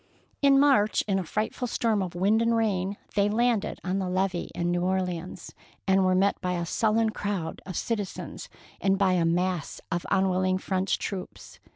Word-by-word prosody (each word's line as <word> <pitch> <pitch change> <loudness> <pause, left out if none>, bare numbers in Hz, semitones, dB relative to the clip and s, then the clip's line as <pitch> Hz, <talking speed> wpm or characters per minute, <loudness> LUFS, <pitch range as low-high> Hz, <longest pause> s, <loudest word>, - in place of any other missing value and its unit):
In 275 -1 +6
March, 265 -7 +4
in 195 -2 +1
a - - -2
frightful 215 +7 -2
storm 225 -3 0
of 180 -2 -4
wind 200 +5 +3
and 230 0 +2
rain, 200 -3 0 0.2
they 200 0 +2
landed 235 0 +1
on 190 +1 -1
the 185 -1 -2
levee 185 -1 -1
in 175 0 0
New 175 0 0
Orleans, 180 -1 -3 0.3
and 190 0 +4
were 185 0 +3
met 195 +2 +2
by 180 -1 -1
a 170 -1 -2
sullen 220 +4 +1
crowd 200 -6 -3
of 185 - -4
citizens 230 - -4 0.3
and 195 0 +2
by 190 -2 +3
a 175 -2 +2
mass 175 -1 -1
of 170 0 -2
unwilling 185 -1 +2
French 190 0 -1
troops. 145 - -7
190 Hz, 180 wpm, -27 LUFS, 180-210 Hz, 0.3 s, In